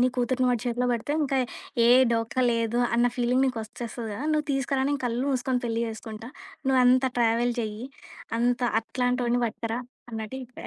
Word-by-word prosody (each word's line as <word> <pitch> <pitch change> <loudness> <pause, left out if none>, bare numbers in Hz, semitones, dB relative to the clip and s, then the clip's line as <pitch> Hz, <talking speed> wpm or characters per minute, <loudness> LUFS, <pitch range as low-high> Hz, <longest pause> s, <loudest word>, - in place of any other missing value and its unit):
నీ 250 - +5
కూతుర్ని 255 +1 +1
వాడి 245 -2 0
చేతిలో 245 +1 0
బెడితే 235 +5 -2
ఇంక 275 -1 -1 0.5
ఏ - - +5 0.2
డోకా 230 +2 0
లేదు 230 0 0 0.2
అన్న 240 +1 +4
ఫీలింగ్ 250 +1 +2
నీకొచ్చేస్తది 230 -1 -5
గదా! 225 +9 -5
నువ్వు 305 -1 0
తీసుకురా, 270 0 0
నేను 285 -1 -1
కళ్ళు 240 +2 -1
మూసుకొని 255 -1 0
పెళ్లి 230 -1 -1
జేసుకుంటా. 220 0 -7 0.4
నువ్వంత 255 0 +5
ట్రావెల్ 235 +1 +2
జెయ్యి, 215 +2 -4 0.5
అంత 245 +1 +1 0.2
అట్లాంటోడిని 245 +1 0
బట్టుకురా" 230 +1 -3 0.3
అన్నట్టు 220 +3 -5
చెప్పా. 250 0 -11
245 Hz, 160 wpm, -26 LUFS, 230-255 Hz, 0.5 s, నీ